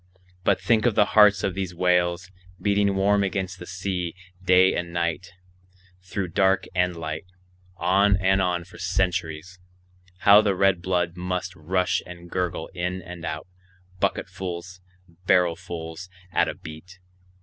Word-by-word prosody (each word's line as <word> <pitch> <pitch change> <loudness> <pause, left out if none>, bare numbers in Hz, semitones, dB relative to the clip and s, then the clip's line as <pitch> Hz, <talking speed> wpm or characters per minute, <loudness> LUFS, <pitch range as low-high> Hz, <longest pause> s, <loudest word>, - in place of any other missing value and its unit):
But - - +2
think 115 0 +2
of 115 - +1
the 105 - +5
hearts 105 -3 +6
of 95 - 0
these 95 -2 -4
whales, 90 0 +1 0.3
beating 100 -1 +2
warm 100 +1 +3
against 95 -1 -3
the 90 - -9
sea, 90 -2 -3 0.3
day 95 0 +5
and 85 0 -3
night, 85 +2 -2 0.7
through 95 0 -4
dark 95 +2 +2
and 90 -1 +1
light, 80 +1 -5 0.5
on 95 +3 +3
and 95 0 +2
on 90 -2 0
for 90 - -15
centuries; 90 -2 -2 0.6
how 100 +1 +8
the 100 -3 +1
red 95 -2 +3
blood 90 -2 0
must 90 +1 -3
rush 90 +4 0
and 85 -1 -11
gurgle 90 -1 -2
in 90 0 -2
and 85 0 -9
out, 80 0 -5 0.5
bucketfuls, 90 0 -3 0.5
barrelfuls 85 -1 0 0.2
at - - +2
a - - -5
beat! 80 +4 -11
90 Hz, 140 wpm, -25 LUFS, 85-95 Hz, 0.7 s, how